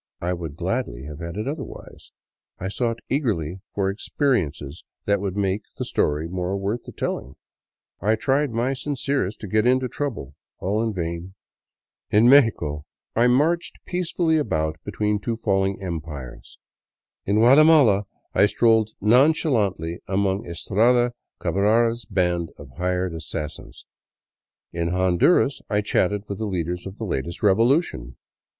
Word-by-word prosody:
I 90 Hz, +1 st, -1 dB
would 80 Hz, -5 st, -6 dB
gladly -, -, -3 dB
have 75 Hz, +1 st, -8 dB
had 85 Hz, +2 st, -6 dB
it 110 Hz, -, -3 dB
otherwise. 145 Hz, -1 st, -8 dB, 0.5 s
I 95 Hz, -, -4 dB
sought 115 Hz, +2 st, -2 dB
eagerly 95 Hz, -, -1 dB, 0.2 s
for 95 Hz, -1 st, 0 dB
experi 125 Hz, -, +1 dB
ences 70 Hz, +1 st, -9 dB, 0.2 s
that 100 Hz, -1 st, +1 dB
would 100 Hz, -1 st, -3 dB
make 100 Hz, 0 st, 0 dB, 0.2 s
the -, -, -3 dB
story 75 Hz, +2 st, 0 dB
more 90 Hz, +2 st, -2 dB
worth 100 Hz, +5 st, -3 dB
the -, -, -8 dB
telling; 65 Hz, -, -4 dB, 0.7 s
I 105 Hz, +4 st, +3 dB
tried 135 Hz, +6 st, +1 dB
my 120 Hz, +3 st, 0 dB
sincerest 135 Hz, -5 st, -2 dB
to 105 Hz, -, -5 dB
get 110 Hz, +4 st, +2 dB
into 130 Hz, 0 st, +3 dB
trouble; 120 Hz, -, -4 dB, 0.2 s
all 105 Hz, +4 st, -1 dB
in 115 Hz, -1 st, 0 dB
vain. 85 Hz, 0 st, -5 dB, 0.7 s
In 110 Hz, +3 st, +5 dB
Mexico 110 Hz, -, +4 dB, 0.3 s
I 120 Hz, +2 st, +4 dB
marched 160 Hz, +7 st, +1 dB
peace 180 Hz, -2 st, -3 dB
fully 160 Hz, -3 st, +2 dB
about 80 Hz, -, -1 dB
between 105 Hz, -1 st, -1 dB
two 115 Hz, +3 st, -2 dB
falling 95 Hz, -3 st, 0 dB
empires. 75 Hz, -7 st, -7 dB, 0.7 s
In 100 Hz, -, +2 dB
Guatemala 125 Hz, -3 st, +6 dB, 0.3 s
I 100 Hz, -, +5 dB
strolled 110 Hz, 0 st, +3 dB
non 125 Hz, +9 st, +5 dB
chalantly 100 Hz, -, -1 dB
among 95 Hz, 0 st, 0 dB
Estrada 120 Hz, +8 st, +2 dB, 0.3 s
Cabrara's 115 Hz, +3 st, +2 dB
band 90 Hz, -4 st, 0 dB
of 70 Hz, -2 st, -12 dB
hired 90 Hz, 0 st, -1 dB
assassins. 80 Hz, -1 st, -7 dB, 0.9 s
In 85 Hz, 0 st, -1 dB
Hon 90 Hz, 0 st, +1 dB
duras 145 Hz, -, +3 dB
I 105 Hz, -1 st, +2 dB
chatted 105 Hz, -1 st, 0 dB
with 100 Hz, -, -5 dB
the 110 Hz, -, -2 dB
leaders 90 Hz, -1 st, -3 dB
of 95 Hz, +2 st, -9 dB
the 110 Hz, -, -4 dB
latest 85 Hz, 0 st, -4 dB
revolution. 105 Hz, -, +2 dB
100 Hz, 145 wpm, -23 LUFS, 85-120 Hz, 0.9 s, Guatemala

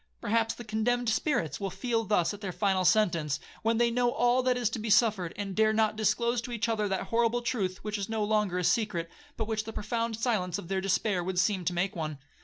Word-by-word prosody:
Perhaps 225 Hz, +1 st, 0 dB
the 240 Hz, -, -8 dB
condemned 235 Hz, +2 st, 0 dB
spirits 220 Hz, -, 0 dB
will 195 Hz, -, -2 dB
feel 230 Hz, +3 st, -1 dB
thus 185 Hz, -2 st, +1 dB
at 205 Hz, -, -10 dB
their 195 Hz, -3 st, -3 dB
final 190 Hz, 0 st, +1 dB
sentence, 170 Hz, -8 st, +2 dB, 0.2 s
when 225 Hz, +1 st, +1 dB
they 235 Hz, 0 st, +3 dB
know 245 Hz, +1 st, +2 dB
all 245 Hz, +1 st, +2 dB
that 255 Hz, -1 st, +1 dB
is 245 Hz, -2 st, +1 dB
to 230 Hz, -, -3 dB
be 220 Hz, +1 st, -4 dB
suffered, 210 Hz, -5 st, +3 dB
and 195 Hz, -2 st, -4 dB
dare 220 Hz, 0 st, +3 dB
not 215 Hz, -1 st, +2 dB
disclose 225 Hz, +3 st, +1 dB
to 245 Hz, -, -7 dB
each 235 Hz, -1 st, -1 dB
other 215 Hz, -2 st, 0 dB
that 195 Hz, -1 st, -1 dB
horrible 235 Hz, +1 st, +1 dB
truth 195 Hz, -7 st, -2 dB
which 210 Hz, -1 st, -3 dB
is 200 Hz, -, -4 dB
no 220 Hz, -1 st, -1 dB
longer 210 Hz, -3 st, +1 dB
a 180 Hz, -, -1 dB
secret, 180 Hz, -5 st, 0 dB, 0.3 s
but 220 Hz, -, -1 dB
which 220 Hz, -1 st, -1 dB
the 225 Hz, -, -7 dB
profound 230 Hz, +1 st, -2 dB
silence 215 Hz, -7 st, 0 dB
of 170 Hz, -, -8 dB
their 190 Hz, -1 st, 0 dB
despair 195 Hz, -1 st, 0 dB
would 185 Hz, +1 st, -3 dB
seem 185 Hz, +1 st, +2 dB
to 180 Hz, -, 0 dB
make 180 Hz, +2 st, -1 dB
one. 155 Hz, -3 st, -4 dB
215 Hz, 235 wpm, -29 LUFS, 190-230 Hz, 0.3 s, they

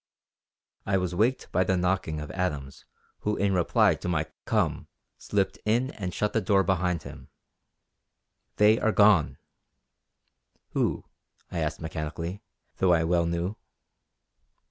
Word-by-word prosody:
I 100 Hz, -1 st, +1 dB
was 90 Hz, -1 st, -2 dB
waked 115 Hz, +8 st, 0 dB
by 90 Hz, -, +3 dB
the 95 Hz, 0 st, +1 dB
knocking 90 Hz, -3 st, 0 dB
of 75 Hz, -, -6 dB
Adams 75 Hz, -8 st, -4 dB, 0.3 s
who 105 Hz, 0 st, -1 dB
in 100 Hz, -1 st, +1 dB
reply 90 Hz, -2 st, +3 dB
to -, -, -6 dB
my 80 Hz, -3 st, 0 dB, 0.2 s
"Come," -, -, 0 dB, 0.3 s
slipped 100 Hz, -2 st, -1 dB
in 120 Hz, +5 st, +1 dB
and 95 Hz, -8 st, -5 dB
shut 105 Hz, +4 st, -1 dB
the 115 Hz, -, +2 dB
door 95 Hz, 0 st, +3 dB
behind 90 Hz, -2 st, 0 dB
him. -, -, -11 dB, 1.3 s
"They 105 Hz, +2 st, +5 dB
are 110 Hz, -, +2 dB
gone!" 100 Hz, -7 st, +4 dB, 1.3 s
"Who?" -, -, -1 dB, 0.5 s
I 85 Hz, -, -3 dB
asked 75 Hz, 0 st, -2 dB
mechanically, 80 Hz, +4 st, -5 dB, 0.4 s
though 95 Hz, -2 st, +4 dB
I 80 Hz, -1 st, +3 dB
well 85 Hz, 0 st, +2 dB
knew. 85 Hz, +5 st, -2 dB
90 Hz, 135 wpm, -27 LUFS, 85-100 Hz, 1.3 s, They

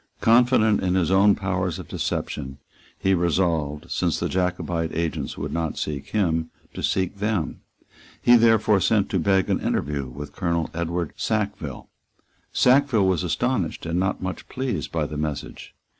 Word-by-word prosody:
Confident 115 Hz, -2 st, +4 dB
in 90 Hz, 0 st, +1 dB
his 90 Hz, -2 st, +1 dB
own 100 Hz, +1 st, +5 dB
powers 95 Hz, -3 st, -2 dB
of -, -, -8 dB
deception, 65 Hz, -2 st, -3 dB, 0.4 s
he 95 Hz, -, +1 dB
resolved, 85 Hz, -4 st, 0 dB
since -, -, 0 dB
the -, -, -1 dB
Jacobite 90 Hz, -2 st, -1 dB
agents 85 Hz, 0 st, -2 dB
would -, -, -4 dB
not 80 Hz, -2 st, -2 dB
seek 70 Hz, -2 st, -4 dB
him, 80 Hz, -6 st, 0 dB, 0.2 s
to -, -, -6 dB
seek 95 Hz, +1 st, 0 dB
them. 100 Hz, -5 st, -2 dB, 0.6 s
He 120 Hz, -, +6 dB
therefore 110 Hz, -3 st, +4 dB
sent 100 Hz, +1 st, +2 dB
to 95 Hz, -, +1 dB
beg 95 Hz, +2 st, +2 dB
an -, -, +1 dB
interview 70 Hz, -1 st, -1 dB
with 70 Hz, +4 st, -8 dB
Colonel 85 Hz, -3 st, -1 dB
Edward 85 Hz, 0 st, -2 dB
Sackville. -, -, -2 dB, 0.6 s
Sackville 130 Hz, -5 st, +4 dB
was 95 Hz, -1 st, +1 dB
astonished 90 Hz, +1 st, -1 dB
and 85 Hz, +1 st, -1 dB
not 95 Hz, 0 st, -1 dB
much 95 Hz, 0 st, -5 dB
pleased 130 Hz, -1 st, -3 dB
by 80 Hz, -2 st, 0 dB
the 75 Hz, 0 st, -5 dB
message. 75 Hz, -2 st, -5 dB
90 Hz, 155 wpm, -24 LUFS, 80-100 Hz, 0.6 s, He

